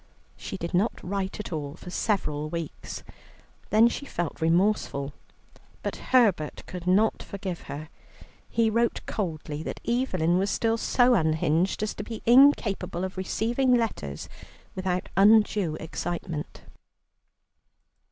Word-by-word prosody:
She 195 - -6
did 170 -1 -5
not 195 +6 +1
write 190 +1 -3
at 210 - -5
all 145 -2 -4
for 180 - -10
several 155 -8 -1
weeks, 165 -1 -6 0.7
then 220 +3 +6
she 280 +4 -4
felt 175 - -4
remorseful, 165 -5 +1 0.7
but - - -3
Herbert 200 - +2
could 180 -1 -7
not 205 +5 +3
forgive 190 -3 -5
her. 150 +2 -6 0.6
He 225 -1 +2
wrote 235 +1 +1
coldly 155 -7 -4
that - - -5
Evelyn 185 -9 +1
was 195 +1 +1
still 225 +2 +1
so 245 +2 +4
unhinged 160 +1 +1
as 215 - -1
to 205 - -6
be 225 +1 -7
incapable 230 -8 +4
of 190 0 -4
receiving 235 +7 +1
letters 75 - -2 0.5
without 185 -1 -2
undue 205 -4 +4
excitement. 165 0 -5
190 Hz, 125 wpm, -27 LUFS, 165-220 Hz, 0.7 s, then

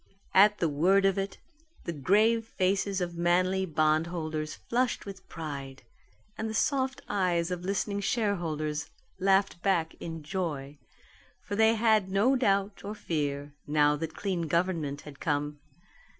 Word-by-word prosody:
At 210 +2 +6
the 170 - +1
word 180 +7 +3
of 195 0 +2
it, 195 +1 -3 0.5
the 170 - -3
grave 215 +9 +3
faces 195 0 0
of 175 -1 -3
manly 185 +2 +2
bondholders 155 0 0
flushed 245 +1 -1
with 195 -2 -10
pride, 140 -4 -6 0.5
and 220 0 -3
the 220 - -4
soft 265 +1 0
eyes 180 -3 0
of 180 -1 -3
listening 200 +1 -1
shareholders 165 -9 -1 0.3
laughed 195 -2 +2
back 175 -5 +1
in 165 -2 -6
joy. 150 -4 -4 0.6
For 205 - -5
they 220 +1 +5
had 220 -3 +3
no 210 +8 +3
doubt 200 -5 +1
or 205 +2 -5
fear, 145 -5 -3
now 150 0 +3
that 160 +1 -5
clean 180 -5 -2
government 165 -4 0
had 145 -2 -12
come. 145 -1 -1
180 Hz, 140 wpm, -29 LUFS, 155-200 Hz, 0.6 s, At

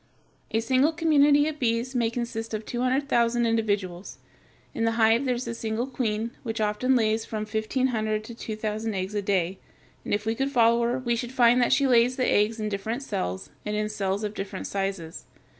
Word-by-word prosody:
A 225 - 0
single 260 +6 +2
community 295 -2 +4
of 310 -1 -4
bees 235 +1 0
may 235 -3 +1
consist 230 -1 -4
of 215 0 -5
two 240 - -3
hundred 260 +3 +1
thousand 235 -1 +2
individuals. 205 -5 -1 0.6
In 225 - -2
the 225 0 +2
hive 230 +3 +3
there 250 -2 +1
is 240 0 -5
a 230 - -3
single 225 +1 -2
queen, 230 -4 -2
which 225 -3 -4
often 215 +5 +1
lays 220 -2 +2
from 215 -1 -4
fifteen 220 +5 -1
hundred 215 -2 -1
to 235 - -9
two 225 -1 -6
thousand 215 0 -3
eggs 190 +2 -3
a 205 - 0
day, 190 -2 0 0.4
and - - -6
if 205 +1 0
we 225 - +1
could 270 +4 -1
follow 235 -2 +4
her, 240 +2 0
we 240 -2 0
should 240 +1 -4
find 245 -1 +4
that 240 - +2
she 280 - +4
lays 250 -1 +4
the 255 - 0
eggs 215 +2 +2
in 215 - -2
different 215 +6 -3
cells, 90 - -4
and 210 0 -3
in 210 0 -1
cells 200 -1 -2
of 210 0 -3
different 195 -1 -5
sizes. 195 -4 -4
225 Hz, 210 wpm, -26 LUFS, 210-245 Hz, 0.6 s, community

